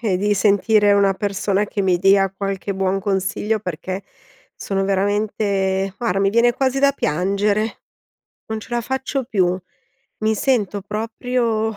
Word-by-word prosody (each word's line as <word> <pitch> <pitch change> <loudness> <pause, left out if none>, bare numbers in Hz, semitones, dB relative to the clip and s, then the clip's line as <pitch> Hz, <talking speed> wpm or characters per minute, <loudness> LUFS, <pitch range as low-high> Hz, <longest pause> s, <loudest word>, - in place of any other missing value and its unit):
e 210 -6 0
di 205 +3 +1
sentire 205 +1 +3
una 200 -1 +4
persona 200 +1 -1
che 205 -1 -2
mi 185 -2 +2
dia 195 +1 +4
qualche 195 0 -3
buon 190 0 0
consiglio, 200 +2 -1
perché 185 0 -5 0.5
sono 195 -1 -2
veramente, 195 -1 0
guarda, 215 -6 0
mi 195 0 +2
viene 235 +2 +3
quasi 265 +1 0
da 280 0 +4
piangere, 200 - 0 0.7
non 220 0 -3
ce 215 - -12
la 240 0 0
faccio 265 +3 -2
più! 185 -7 +1 0.6
Mi 220 0 +1
sento 210 -5 0
proprio 225 +1 -2
205 Hz, 145 wpm, -20 LUFS, 195-220 Hz, 0.7 s, una